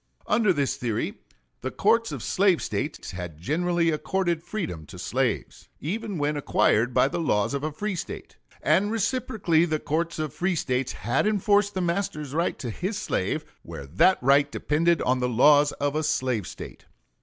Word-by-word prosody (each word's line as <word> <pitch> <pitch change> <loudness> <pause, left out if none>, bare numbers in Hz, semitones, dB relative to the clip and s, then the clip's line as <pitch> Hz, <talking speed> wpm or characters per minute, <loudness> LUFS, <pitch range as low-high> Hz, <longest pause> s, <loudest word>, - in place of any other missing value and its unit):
Under 210 -2 +3
this 140 -4 0
theory, 120 -5 -2 0.4
the 130 - -2
courts 225 - +2
of 135 -6 -5
slave 190 -3 +3
States - - -4
had 90 -3 -7
generally 165 - +1
accorded 175 +1 -1
freedom 165 - -5
to - - -11
slaves, - - -2
even 205 +4 -3
when 150 0 0
acquired 125 -4 +2
by 130 - +4
the 145 - -3
laws 105 -8 +1
of 140 0 -2
a 155 - -1
free 210 +7 -3
State, 170 - -7 0.3
and 205 +2 +3
reciprocally 215 -7 +1
the 155 -3 0
courts 165 +3 -2
of 155 -4 -3
free 180 0 0
States 130 -4 -1
had 120 - 0
enforced 205 -1 +2
the 185 - 0
master's 170 -5 -2
right 165 +3 0
to 120 -4 -5
his 190 - -3
slave 95 - -2 0.2
where 70 - -8
that 95 - +4
right 140 +2 +4
depended 165 +3 +1
on 130 0 +1
the 125 0 0
laws 145 +4 +5
of 145 0 -2
a 155 - +1
slave 130 - 0
State. - - -10
155 Hz, 175 wpm, -26 LUFS, 135-185 Hz, 0.4 s, laws